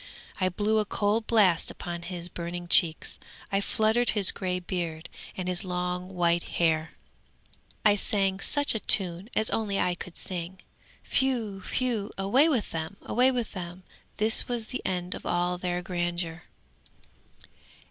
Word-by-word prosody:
I 185 -1 +2
blew 210 +4 +1
a - - +2
cold 210 +2 0
blast 195 -7 +3
upon 175 -1 -6
his 175 -1 -5
burning 175 0 -6
cheeks, 165 -2 +2 0.3
I 195 0 +1
fluttered 220 +4 +1
his 200 -2 +5
grey 180 -1 -2
beard 175 -3 -4 0.3
and 185 -1 -3
his 180 -1 -1
long 180 0 -3
white 170 -1 +2 0.2
hair; 160 -2 +1 0.9
I 205 -1 +6
sang 195 -2 0
such 290 +7 +2
a 220 - -1
tune 185 0 +5
as 220 - +2
only 205 -3 -1
I 180 - +1
could 175 0 -8
sing. 180 0 -3 0.5
Whew! 235 -7 0
whew! 235 -5 0
away 245 +11 +4
with 245 -10 0
them! 165 +4 -4
away 250 +2 +3
with 245 -4 -2
them! 180 -1 -7 0.3
This 220 +2 +5
was 240 -2 -2
the 255 - -4
end 180 -1 -2
of - - -8
all 175 0 0
their 180 -1 -2
grandeur. 175 -1 -3
185 Hz, 150 wpm, -27 LUFS, 175-215 Hz, 0.9 s, I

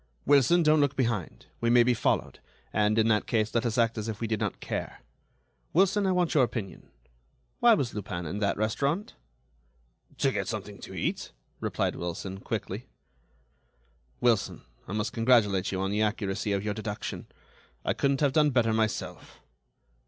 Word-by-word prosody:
"Wilson, 145 +5 +5
don't 155 0 +4
look 145 -2 +2
behind. 115 -9 -2
We 115 - +1
may 120 0 +6
be 125 +1 +3
followed, 115 - 0 0.3
and, 105 +1 +2
in 110 0 +4
that 105 -1 +2
case, 110 -1 0
let 120 +1 +1
us 115 - -2
act 115 -1 +2
as 110 - -4
if 110 - -5
we 115 - -2
did 110 -1 -1
not 105 -3 -2
care. - - -5 0.7
Wilson, 195 +3 +3
I - - +2
want 180 -2 +1
your 145 -5 +5
opinion: 110 -5 -4 0.7
why 240 -1 +6
was 130 - -2
Lupin 95 -4 -5
in 90 +7 -4
that 100 -2 0
restaurant?" 140 - -1 1.0
"To - - +2
get - - -2
something - - -5
to - - -9
eat," - - -3 0.3
replied - - -1
Wilson, 90 +3 -5
quickly. 110 +2 -4 1.3
"Wilson, 115 -4 +1 0.2
I - - -5
must 105 0 -2
congratulate 115 -6 +3
you 95 - -2
on 95 0 -1
the 105 +1 0
accuracy 105 -1 -1
of 100 0 0
your 105 - 0
deduction. 105 -1 -5 0.6
I - - +2
couldn't 140 0 0
have 140 -3 +3
done 150 0 +4
better 120 -4 +2
myself." 110 -1 -2
115 Hz, 170 wpm, -28 LUFS, 105-135 Hz, 1.3 s, may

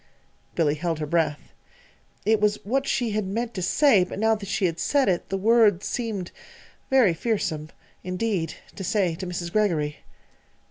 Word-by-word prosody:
Billy 150 -3 +2
held 165 +1 -2
her 155 - -3
breath. 155 -1 -1 0.7
It 220 -1 +3
was 210 0 +3
what 270 +5 0
she 240 -5 0
had 210 -2 -1
meant 230 +4 -3
to 185 - -4
say, 210 +2 +4
but 180 - -6
now 220 +2 +3
that 205 -3 -5
she 200 - 0
had 170 -2 -1
said 285 -2 +2
it, 180 -3 0
the 195 - -1
words 210 -2 +4
seemed 215 -7 -3 0.6
very 255 -9 +5
fearsome 165 -6 -2 0.3
indeed 185 -2 -2 0.2
to 195 - -6
say 190 -3 +1
to 185 +3 -6
Mrs. 175 -1 -4
Greggory. 165 -9 0
195 Hz, 170 wpm, -25 LUFS, 170-220 Hz, 0.7 s, very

